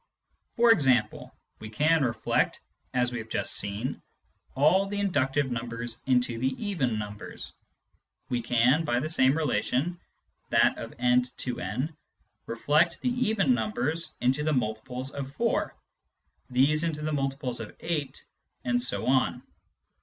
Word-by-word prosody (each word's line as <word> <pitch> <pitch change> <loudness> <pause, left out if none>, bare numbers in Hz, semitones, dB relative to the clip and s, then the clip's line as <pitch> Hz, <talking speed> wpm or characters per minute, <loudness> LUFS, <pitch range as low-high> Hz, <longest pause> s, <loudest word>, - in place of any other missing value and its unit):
For 235 0 +6
example, 130 - +2 0.3
we 110 - -8
can 155 +8 +2
reflect, 120 -3 0 0.3
as 125 -1 +1
we 120 - -3
have 110 0 -8
just - - 0
seen, 105 +6 -1 0.5
all 180 +8 +4
the 205 +1 -4
inductive 145 -8 +1
numbers 120 0 -4
into 125 -3 +2
the 130 - +1 0.2
even 135 - 0
numbers; 105 -1 -6 0.7
we 120 -1 -1
can, 125 +6 +3
by 120 -6 +1
the 155 +4 -3
same 135 -2 +4
relation 150 +4 0 0.5
(that - - +3
of - - -8
n 125 0 +4 0.2
to 125 - -3
2») 125 - -3 0.5
reflect 150 +8 +2
the 250 - +1
even 220 - +2
numbers 120 +9 -1
into 130 +4 +2
the 155 0 +1
multiples 125 +2 -2
of 140 0 -6
4, 235 0 0 0.7
these 140 +5 +3
into 155 -2 -2
the 155 0 -1
multiples 135 -3 -2
of 115 - -8
8, 155 -5 -3 0.4
and 120 0 +1
so 125 - -1
on. 130 0 +1
130 Hz, 140 wpm, -28 LUFS, 120-155 Hz, 0.7 s, For